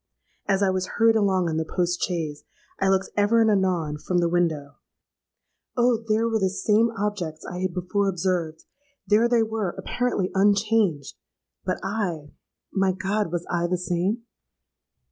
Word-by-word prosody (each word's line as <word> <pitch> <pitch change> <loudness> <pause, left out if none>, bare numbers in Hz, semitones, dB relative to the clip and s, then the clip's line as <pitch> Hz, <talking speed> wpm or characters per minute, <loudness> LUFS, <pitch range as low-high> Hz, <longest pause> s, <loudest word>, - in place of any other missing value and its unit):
As 200 0 +2
I 190 - +3
was 185 0 -1
hurried 225 -1 +5
along 190 -4 +2
in 160 -1 -1
the 160 - +1
post 175 0 +1
chaise, 160 -5 -2 0.4
I 195 - +2
looked 190 0 +1
ever 210 +3 +3
and 220 -1 +4
anon 180 -7 0
from 180 +4 -1
the 175 -1 +3
window; 160 -5 -1 1.0
oh! 240 -2 +3
there 220 +1 +2
were 225 -1 +1
the 190 -2 +2
same 215 +4 +2
objects 190 -6 -3
I 180 - -6
had 185 -1 -2
before 195 +2 0
observed;—there 195 - -1
they 235 -2 +4
were, 220 -5 -2
apparently 245 -7 -1
unchanged;—but 195 - 0
I—my 190 0 -3
God—was 190 -3 -2
I 175 0 0
the 180 +1 0
same? 180 +6 -1
190 Hz, 145 wpm, -25 LUFS, 175-215 Hz, 1.0 s, hurried